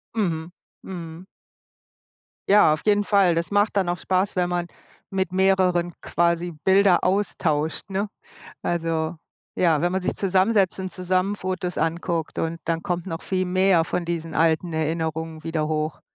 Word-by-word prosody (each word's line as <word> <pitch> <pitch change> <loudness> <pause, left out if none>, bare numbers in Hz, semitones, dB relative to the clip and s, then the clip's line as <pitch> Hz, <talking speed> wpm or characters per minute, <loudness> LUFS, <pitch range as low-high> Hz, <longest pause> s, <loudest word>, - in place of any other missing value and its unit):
Mhm, 170 -5 -1 0.3
mhm. 170 -1 -8 1.2
Ja, 205 -6 +6
auf 155 - -3
jeden 205 -1 +3
Fall. 195 -5 +3
Das 170 +3 -2
macht 205 +1 +2
dann 190 -3 +1
auch 175 - -1
Spaß, 190 +1 0
wenn 180 - +2
man 175 -1 -1 0.4
mit 190 -1 -2
mehreren 185 -2 +2
quasi 170 0 0
Bilder 190 -2 +4
austauscht, 175 -5 0
ne? 195 +2 -1 0.6
Also, 165 -1 -1 0.4
ja, 165 -4 +3
wenn 175 +1 +1
man 190 0 -1
sich - - -2
zusammensetzt 195 0 +2
und 185 -1 -5
zusammen 185 +2 0
Fotos 185 -1 -3
anguckt 165 0 -2
und 165 +1 -2
dann 165 0 -1
kommt 175 0 -2
noch 165 -2 -5
viel 185 -1 -1
mehr 185 -2 +3
von 175 - -2
diesen 165 -1 -4
alten 165 +1 +2
Erinnerungen 160 0 -2
wieder 160 -2 -1
hoch. 155 0 -2
175 Hz, 150 wpm, -24 LUFS, 165-190 Hz, 1.2 s, Ja